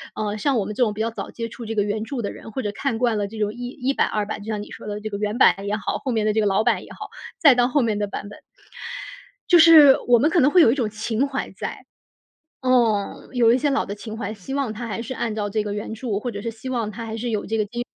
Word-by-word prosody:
呃， 210 -1 -2
像 270 +4 +1
我 205 - 0
们 210 - -5
这 250 - -4
种 215 - +1
比 220 - -3
较 230 +1 0
早 - - -6
接 230 -1 -5
触 235 - -10
这 225 - -3
个 205 - +2
原 210 +1 -2
著 245 -3 -4
的 200 - -2
人， 225 - -11
或 260 +4 -4
者 205 - -2
看 230 +1 -2
惯 235 -3 +1
了 205 - -1
这 220 +2 -10
种 210 0 -1
一 245 +1 -6
一 265 +1 -2
版 - - +2
二 210 -1 -1
版， 210 - -5
就 205 - -11
像 210 -2 -3
你 - - -13
说 - - -9
的 205 0 -4
这 215 +1 -5
个 200 - -4
原 210 +2 -2
版 - - +6
也 205 - 0
好， 215 - -3
后 260 - -1
面 220 -2 0
的 215 - +2
这 220 - +1
个 210 - +2
老 195 +2 +2
版 240 - +1
也 - - -14
好， - - -9 0.3
再 285 -5 +7
到 245 0 +3
后 270 0 +2
面 215 -2 0
的 205 - -1
版 200 +1 -6
本。 205 - -12 1.1
就 350 - +6
是 315 -4 +9
我 240 - +6
们 295 - +3
可 335 0 +3
能 280 +3 +4
会 360 - +6
有 230 - +6
一 - - +1
种 240 -6 -1
情 220 +4 -1
怀 275 0 -4
在。 - - -7 0.8
哦， 235 -6 +1
有 235 -2 +4
一 - - +3
些 290 - +1
老 275 - +1
的 200 - -5
情 215 +1 -8
怀， 215 -1 -4
希 220 +7 -7
望 270 -6 -1
它 235 +2 -6
还 225 - -4
是 255 +3 -5
按 230 -3 -3
照 205 -1 -2
这 215 +1 0
个 205 -1 -4
原 210 +1 -5
著， 220 -2 -3
或 245 +3 -4
者 205 -2 -6
是 230 - -3
希 225 +4 -8
望 235 -4 -1
它 230 +2 -7
还 220 0 -5
是 235 +2 -3
有 215 -3 -2
这 225 - -2
个 215 - +1
低 240 +3 -5
225 Hz, 335 characters per minute, -23 LUFS, 210-250 Hz, 1.1 s, 是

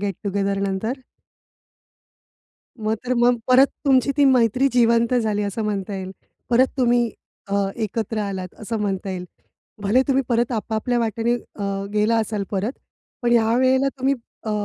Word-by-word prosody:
गेट-टुगेदरनंतर? 200 +3 -2 1.8
मग 215 0 -1
तर 255 0 0
मग 240 0 +3
परत, 255 +2 +7 0.2
तुमची 265 -2 +4
ती 285 - +5
मैत्री 255 0 +4
जिवंत 235 0 +3
झाली 215 -4 +1
असं 205 +2 -3
म्हणता 205 -1 -2
येईल? 190 -1 -5 0.4
परत 250 +2 +5
तुम्ही 240 -2 +3 0.4
अ, - - 0 0.2
एकत्र 220 0 -2
आलात 190 -3 -4
असं 225 +1 -3
म्हणता 195 -1 -2
येईल. 180 -1 -4 0.6
भले 215 +6 +3
तुम्ही 270 0 +3
परत 240 0 +1
आपापल्या 225 +2 -1
वाटेने 230 +1 0
अ, 200 -4 -4
गेला 215 +2 +2
असाल 215 -2 -1
परत. 205 +4 -1 0.5
पण 240 - +1
ह्यावेळेला 255 +4 +3
तुम्ही 270 +2 +2 0.3
अ, 220 - -2
225 Hz, 140 wpm, -22 LUFS, 200-245 Hz, 1.8 s, परत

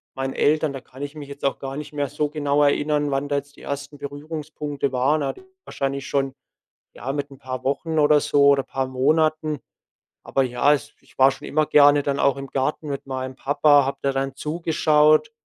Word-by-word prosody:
meinen 135 0 -3
Eltern 150 -1 +2
da 135 - -7
kann 130 +1 -14
ich 145 +1 -5
mich 145 -2 -8
jetzt 140 0 -11
auch 140 - +1
gar 135 0 -6
nicht 150 0 -7
mehr 145 -1 -1
so 150 0 -1
genau 145 -1 0
erinnern, 145 0 +1
wann 135 +1 -1
da 145 - +1
jetzt 140 0 -6
die - - -16
1. 145 +1 -6
Berührungspunkte 145 -1 -5
waren. 140 +4 +1
Aber 135 - -4 0.2
wahrscheinlich 135 0 -3
schon, 135 -1 -1 0.6
ja, 135 +2 -5
mit 145 -1 -4
'n 135 - -12
paar 130 0 -6
Wochen 155 +4 -1
oder 150 0 +5
so 140 0 +2
oder 140 -1 +4
paar 130 0 -3
Monaten. 155 +3 +1 0.7
Aber 135 - +1
ja, 130 +3 +2
es 145 0 -2
ich - - -25
war 135 +1 +7
schon - - -9
immer 155 0 +1
gerne 145 -1 +6
dann 140 0 -1
auch 140 -1 +3
im 135 - -6
Garten 140 +4 -2
mit 140 -1 -4
meinem 130 -1 -5
Papa, 145 0 +4
habe 135 - -3
da 140 -1 +1
dann 135 0 -2
zugeschaut, 155 +4 +2
145 Hz, 205 wpm, -23 LUFS, 135-150 Hz, 0.7 s, war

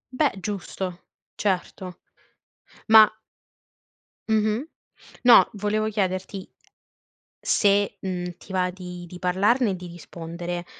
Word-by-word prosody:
Beh 285 -7 +1
giusto, 185 -2 -5 0.4
certo, 185 -2 -3 0.9
ma 220 -1 +9 1.2
Mh-mh, 215 +3 +1 0.6
no 245 - +8
volevo 215 +1 -1
chiederti 190 -1 -3 0.9
se, 205 -1 +2
mhmm, 180 -2 -4
ti 190 - -12
va 180 -1 +1
di 180 -1 -9
di 180 +1 -11
parlarne 200 +6 +2
e - - -2
di 180 0 -9
rispondere, 175 +1 -7
190 Hz, 100 wpm, -24 LUFS, 180-210 Hz, 1.2 s, ma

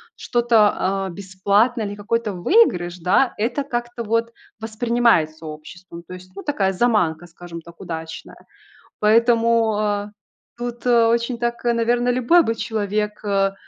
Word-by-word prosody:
что-то, 210 -5 +1
э, - - -11
бесплатное 200 +4 0
или 205 - -6
какой-то 215 +1 -2
выигрыш, 180 - +2
да, 190 +10 +2
это 240 +6 -1
как-то 240 -3 -4
вот 230 +1 -1 0.3
воспринимается 220 -8 +1
обществом. 170 +3 -11
То 180 - -11
есть, 185 0 -12
ну, 200 - -8
такая 200 -10 0
заманка, 180 -7 +1
скажем 170 -1 -10
так, 170 +1 -16
удачная. 160 -3 -7 0.6
Поэтому, 230 0 +3
э, 205 -1 -1 0.5
тут, 240 0 -6
э, 235 -2 +4
очень 235 +1 0
так, 235 0 -2
наверно, 240 +1 +1
любой 255 +8 +4
бы 225 - 0
человек, 210 -1 -3
э, 195 -1 +1
215 Hz, 135 wpm, -21 LUFS, 185-235 Hz, 0.6 s, э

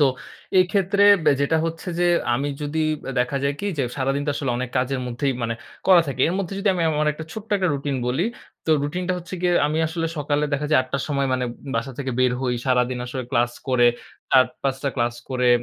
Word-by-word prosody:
তো 145 - +6 0.5
এক্ষেত্রে 195 +2 +2 0.2
বে 150 - +6
যেটা 140 +3 +2
হচ্ছে 165 +2 -4
যে, 175 - +4 0.3
আমি 140 +4 -1
যদি, 150 +2 -1 0.4
দেখা 125 +3 -1
যায় 140 0 +1
কি? 205 - -2
যে, - - +2
সারাদিন 135 +1 0
তো - - +2
আসলে 135 -2 -2
অনেক 125 0 -3
কাজের 130 +1 -1
মধ্যেই 125 +3 -1
মানে, 115 0 -1 0.3
করা 185 -2 +8
থাকি। 135 -2 -4
এর 170 - -1
মধ্যে 195 0 -3
যদি 200 +1 0
আমি, 175 - 0
আমার 150 0 0
একটা 160 +2 -8
ছোট্ট 220 0 -8
একটা 185 -2 +1
রুটিন 140 0 -2
বলি। 130 +8 +1 0.4
তো - - +1
রুটিনটা 180 +5 -2
হচ্ছে 180 +2 -8
গিয়ে, 180 -1 +2
আমি 155 +2 -1
আসলে 165 +1 -2
সকালে 145 0 0
দেখা 140 +1 0
যায় 155 - +5
৮ 130 - -14
টার 140 - 0
সময় 140 -2 0
মানে 130 0 0 0.3
বাসা 130 +4 -2
থেকে 135 -2 -2
বের 130 -1 +3
হই। 125 -2 0
সারাদিন 125 -1 +2
আসলে 130 +1 -4
ক্লাস 120 +1 +2 0.2
করে 125 -2 +4 0.4
৪-৫ 130 +1 +2
টা 140 - +1
ক্লাস 120 -1 0 0.2
করে, 125 -1 +1
140 Hz, 215 wpm, -23 LUFS, 130-165 Hz, 0.5 s, করা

